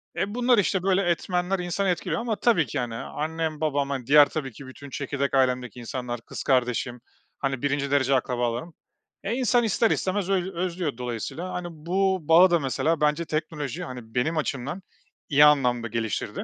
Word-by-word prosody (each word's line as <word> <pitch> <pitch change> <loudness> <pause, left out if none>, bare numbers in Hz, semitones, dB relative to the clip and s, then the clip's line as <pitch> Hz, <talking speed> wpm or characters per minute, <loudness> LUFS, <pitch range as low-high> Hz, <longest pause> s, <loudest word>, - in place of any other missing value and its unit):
E, 205 +2 -2
bunlar, 245 0 +3
işte, 190 -2 +1
böyle 190 0 +3
etmenler 180 +2 0
insanı 180 +2 -1
etkiliyor 180 +6 -1
ama 230 -2 -1
tabii 200 -9 +3
ki - - -5
yani 120 -2 -2
annem, 155 +4 -3
babam, 140 -4 -1
diğer 145 +2 +7
tabii 140 -4 -4
ki 130 +4 -12
bütün 140 +2 -11
çekirdek 140 0 -3
ailemdeki 125 -3 +1
insanlar, 120 0 -5
kız - - -7
kardeşim, 125 -2 0 0.4
hani, 135 -3 -2
1'inci 145 -1 -1
derece 140 -1 +3
akrabalarım. 125 +4 -1 0.5
E, 200 - -1
insan 245 -1 +2
ister 225 +1 +2
istemez 190 0 -1
öz 190 -2 +1
özlüyor 170 -5 -2
dolayısıyla, 125 - -5
hani, 180 -1 -4
bu 185 +4 0
bağı 165 +4 +6
da 170 - +4
mesela 150 +3 0
bence 150 +3 +2
teknoloji, 155 -4 -3
hani, 125 -3 -9
benim 155 +6 +1
açımdan 145 +5 -3 0.5
iyi 145 0 +7
anlamda 125 -5 +3
geliştirdi. 115 -1 -3
150 Hz, 170 wpm, -25 LUFS, 130-180 Hz, 0.5 s, diğer